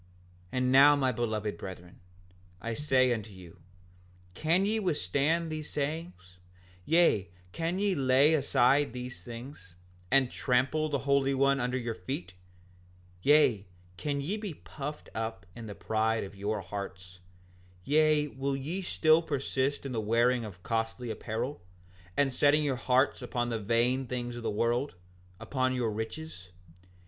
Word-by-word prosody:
5:53 90 - -28 0.5
And 125 0 +1
now 140 +2 +8
my 135 -2 +1
beloved 110 -3 -2
brethren, 90 -2 -9 0.6
I 115 +5 -4
say 130 -2 +3
unto 110 -2 -5
you, 90 -1 -13 0.7
can 165 - +2
ye 220 +2 +1
withstand 160 - 0
these 155 -1 -5
sayings; 145 - -5 0.5
yea, 165 - +3 0.2
can 165 - -2
ye 200 0 +1
lay 135 +1 +4
aside 140 -2 +3
these 125 +1 -7
things, 115 -7 -10 0.3
and 135 -2 +4
trample 135 +5 +1
the 145 - 0
Holy 140 -1 +2
One 140 +1 +3
under 125 +1 -1
your 120 -2 -3
feet; 105 -6 -6 0.9
yea, 130 -7 +4 0.3
can 140 +8 -2
ye 185 +10 -2
be 205 -7 -5
puffed 150 +1 -7
up 110 -5 -4
in 115 -1 -8
the 100 - -7
pride 110 0 0
of 100 0 -9
your 100 +1 -2
hearts; 95 -1 -7 0.6
yea, 150 +2 +3
will 135 0 -3
ye 155 +8 -4
still 160 -3 +3
persist 140 -2 -1
in 135 - -4
the 115 -3 -1
wearing 120 +3 +2
of 95 -4 -9
costly 115 +1 -2
apparel 115 +3 -4 0.6
and 140 -2 +2
setting 145 +3 +4
your 140 -3 0
hearts 130 +3 +2
upon 120 -1 -2
the 115 -1 -2
vain 120 +5 +1
things 120 -1 -4
of 120 - -6
the 115 - -2
world, 120 +4 0 0.4
upon 130 -1 -1
your 120 -3 0
riches? 110 - -6
130 Hz, 150 wpm, -30 LUFS, 110-145 Hz, 0.9 s, now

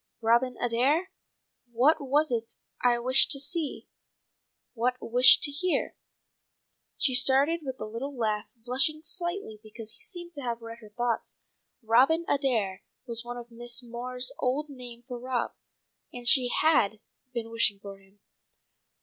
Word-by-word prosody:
Robin 235 +3 +2
Adair? 275 +10 +1 0.6
What 260 +7 +4
was 290 +2 +1
't 230 -1 -2 0.3
I 245 -1 +4
wished 255 +3 +4
to 275 - +4
see? 300 +2 -2 0.9
What 250 +1 0
wished 250 +2 +6
to 290 - +5
hear?'" 355 +5 -1 1.0
She 260 - +2
started 275 +6 +4
with 265 -2 -6
a - - -4
little 250 +6 -6
laugh, 215 -2 -1
blushing 265 +6 0
slightly 345 - -4
because 220 0 -9
he - - -14
seemed 345 -2 -7
to 285 - -7
have 235 -2 -4
read 230 0 -9
her 215 -2 -14
thoughts. 235 +1 -3 0.5
"Robin 265 +10 +3
Adair" 225 -9 0 0.2
was 235 -2 -3
one 240 0 -7
of 240 0 -9
Mrs. 240 +1 -5
Moore's 250 +1 -2
old 280 +4 -1
names 245 -3 -10
for 245 -2 -6
Rob, 250 -1 -2 0.6
and 245 -1 -9
she 250 0 +5
had 240 -9 +2 0.3
been 230 -2 -5
wishing 230 -3 +2
for 195 -1 -10
him. 195 +1 -26
245 Hz, 150 wpm, -28 LUFS, 230-275 Hz, 1.0 s, wished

